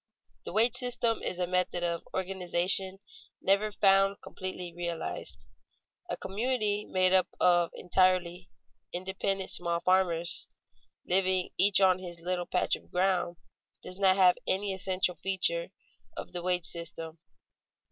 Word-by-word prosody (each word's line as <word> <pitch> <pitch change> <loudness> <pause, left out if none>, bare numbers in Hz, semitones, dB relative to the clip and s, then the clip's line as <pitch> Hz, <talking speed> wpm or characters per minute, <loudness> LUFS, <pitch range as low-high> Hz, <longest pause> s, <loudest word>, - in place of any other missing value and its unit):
_ - - -48
The - - -6
wage 225 +5 +4
system 245 -2 0
is 180 - -3
a 180 - 0
method 180 0 -1
of 170 -1 -1
organization 190 0 -1 0.4
never 200 +3 +1
found 195 0 +3
completely 180 -2 -6
realized. 170 -1 -4 0.6
A - - -3
community 210 -1 -1
made 185 0 +3
up 185 -1 +4 0.5
entirely 180 -1 +1
of 115 -5 -45
independent 190 +1 -2
small 170 -1 0
farmers, 180 -2 +1 0.6
living 185 0 +2
each 195 +1 +7
on 185 -2 +4
his 175 -2 -8
little 175 +1 -3
patch 180 - +2
of - - -15
ground, 180 -1 0 0.5
does 185 +1 -8
not 190 -1 +4
have 185 -2 +4
any 195 +1 0
essential 185 -1 -1
feature 345 - 0 0.5
of - - -7
the 175 - -4
wage 180 -1 0
system. 165 -1 -4
185 Hz, 135 wpm, -29 LUFS, 175-195 Hz, 0.6 s, each